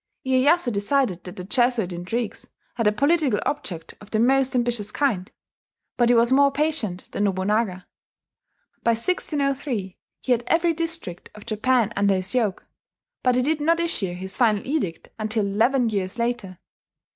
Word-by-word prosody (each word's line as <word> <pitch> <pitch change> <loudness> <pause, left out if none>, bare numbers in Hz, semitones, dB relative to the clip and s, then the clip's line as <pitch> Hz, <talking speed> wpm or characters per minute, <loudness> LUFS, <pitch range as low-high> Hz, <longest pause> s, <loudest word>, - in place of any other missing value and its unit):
Iyeyasu 260 +2 +3
decided 205 -3 0
that 180 - -8
the 180 - -6
Jesuit 235 -2 +1
intrigues 205 +6 -4 0.3
had 230 -3 0
a - - +5
political 280 0 +2
object 175 - -4
of 205 - -13
the 220 - -1
most 260 +3 +3
ambitious 240 -4 0
kind; 210 -8 -1 0.6
but 240 -1 +3
he 245 - +5
was 235 +1 +4
more 280 +1 +5
patient 275 - -2
than 205 - 0
Nobunaga. 190 0 0 1.0
By 230 - +3
1603 275 - -1 0.2
he, 260 - -3
had 240 -1 +3
every 335 0 +3
district 330 - -4
of 210 - -12
Japan 230 0 +1
under 200 -1 +3
his 185 +1 -3
yoke; 220 -7 0 0.6
but 250 -1 +2
he 250 - +2
did 305 +2 0
not 335 +3 +2
issue 200 - -1
his 190 +2 -6
final 220 -5 +2
edict 265 - -3
until 215 -1 0
eleven 230 +5 +2
years 195 -1 -2
later. 235 -6 -2
235 Hz, 155 wpm, -24 LUFS, 200-270 Hz, 1.0 s, a